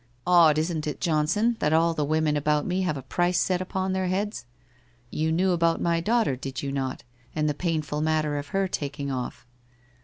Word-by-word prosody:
' - - -37
Odd 170 -4 +6
isn't 155 -1 -1
it, 150 - -4
Johnson, 175 +8 +1
that 150 +1 +1
all 165 +1 +3
the 155 - -1
women 155 0 +1
about 150 0 +1
me 185 +1 0
have 155 -6 -1
a 135 - -7
price 175 +6 0
set 185 -1 +1
upon 190 0 -2
their 190 -1 0
heads? 190 - -2 0.6
You 160 +1 0
knew 185 +3 +2
about 170 -1 +2
my 170 -1 +1
daughter, 215 - +1
did 130 0 -6
not 135 -2 -3
you, - - -31 0.3
and 155 -1 +1
the 150 - +1
painful 155 -2 -2
matter 155 -2 0
of 145 - -7
her 195 +5 0
taking 140 -4 -4
off? 125 -1 -5
160 Hz, 205 wpm, -26 LUFS, 150-180 Hz, 0.6 s, Odd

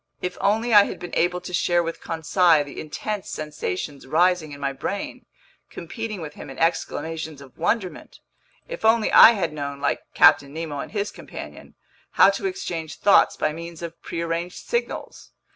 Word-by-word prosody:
If 180 0 -4
only 225 +4 +1
I 205 -1 +8
had - - -6
been 175 -1 -9
able 180 +1 +1
to 180 0 -8
share 175 -1 +2
with 165 0 -5
Conseil 165 -1 +2
the 145 - -8
intense 205 +6 -5
sensations 145 -2 -5
rising 170 +1 +2
in 140 - -9
my 140 -1 -2
brain, 195 +9 -5 0.4
competing 215 +3 -6
with 155 -2 -7
him - - -10
in 135 - -10
exclamations 160 -2 -2
of 140 -2 -14
wonderment! 185 +2 -2 0.5
If - - -7
only 220 0 +3
I 230 - +9
had 170 -7 -2
known, 140 -1 -5
like 140 - 0
Captain 140 0 +5
Nemo 160 -3 -4
and - - -6
his 205 -1 -2
companion, - - -10 0.4
how - - +6
to 390 - -3
exchange 175 - -5
thoughts 200 - +4
by 155 - 0
means 170 +1 -8
of 170 0 -8
prearranged 170 +1 -4
signals! 475 0 -4
170 Hz, 170 wpm, -23 LUFS, 155-195 Hz, 0.5 s, I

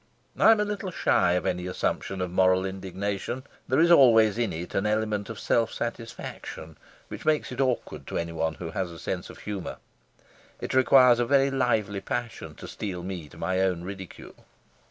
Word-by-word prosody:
I - - +5
am 225 -1 +6
a 210 - +2
little 205 -2 -4
shy 90 - +2
of 90 - 0
any 90 0 -1
assumption 95 +1 -2
of 90 -1 -2
moral 95 0 +3
indignation; 95 +5 -4 0.2
there 130 - +2
is 170 +1 +5
always 115 - +6
in 115 -3 0
it 85 +2 -6
an 100 +2 0
element 105 -1 -1
of 115 - -6
self 115 -1 +1
satisfaction 115 -8 -6 0.3
which - - -8
makes 155 -1 +1
it - - -2
awkward 120 - -2
to - - -3
anyone 80 -1 -2
who 80 -1 -6
has 95 +1 -2
a 85 - -10
sense 90 +2 -4
of - - -11
humour. 100 -4 -5 0.8
It - - -4
requires 130 -2 +6
a 120 - +2
very 140 +1 +3
lively 110 -7 0
passion 120 +4 -5
to - - -10
steel 90 -4 -5
me 90 -5 -6
to - - -15
my 95 +2 -1
own 90 -3 0
ridicule. 95 -1 -9
100 Hz, 185 wpm, -27 LUFS, 90-120 Hz, 0.8 s, am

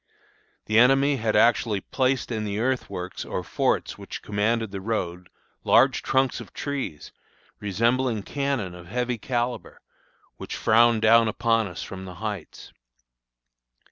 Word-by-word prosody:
The 110 +1 +3
enemy 135 +3 +4
had 110 -2 -1
actually 115 -3 +3
placed 130 +4 -1
in 110 -2 -2
the 105 -1 -3
earthworks 110 -7 -2
or - - -4
forts - - -1
which - - -8
commanded 110 +1 0
the 95 -1 -5
road, 90 -4 -3 0.3
large - - +4
trunks 130 -1 +1
of - - -11
trees, 140 - -4 0.5
resembling 115 +3 0
cannon 140 -10 -2
of 85 -1 -12
heavy 125 +3 -2
calibre, 120 +1 -3 0.6
which - - -6
frowned 115 0 +4
down 115 +1 +6
upon 115 0 +1
us 90 - -7
from 95 -1 -8
the 90 -1 -9
heights. 105 -3 -7
115 Hz, 135 wpm, -25 LUFS, 100-125 Hz, 0.6 s, down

